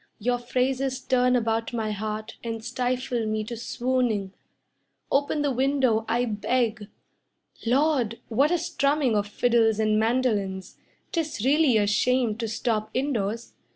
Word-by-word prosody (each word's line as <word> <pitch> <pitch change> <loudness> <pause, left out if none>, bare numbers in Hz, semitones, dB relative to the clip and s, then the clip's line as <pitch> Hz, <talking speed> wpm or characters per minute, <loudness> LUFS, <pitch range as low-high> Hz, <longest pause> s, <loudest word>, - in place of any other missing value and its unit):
Your 245 +3 0
phrases 260 +2 -1
turn 250 -1 +2
about 225 -1 0
my 220 -2 -1
heart 215 +1 -4
And 225 -1 -5
stifle 250 -2 -1
me 215 0 -1
to 235 +2 -6
swooning. 235 -4 -1 0.8
Open 285 +2 +1
the 285 - +1
window, 260 -4 +1
I 245 +2 +2
beg. 220 0 -1 0.8
Lord! 255 -3 +2
What 270 +6 +2
a 350 - +2
strumming 290 -7 +1
of 205 0 0
fiddles 225 0 +2
and 215 0 +2
mandolins! 220 -5 -1 0.3
'Tis 310 - -2
really 280 -3 +4
a 205 - +3
shame 240 +2 +2
to 230 -1 -3
stop 215 -1 -1
indoors. 235 -4 -2
240 Hz, 135 wpm, -26 LUFS, 220-260 Hz, 0.8 s, really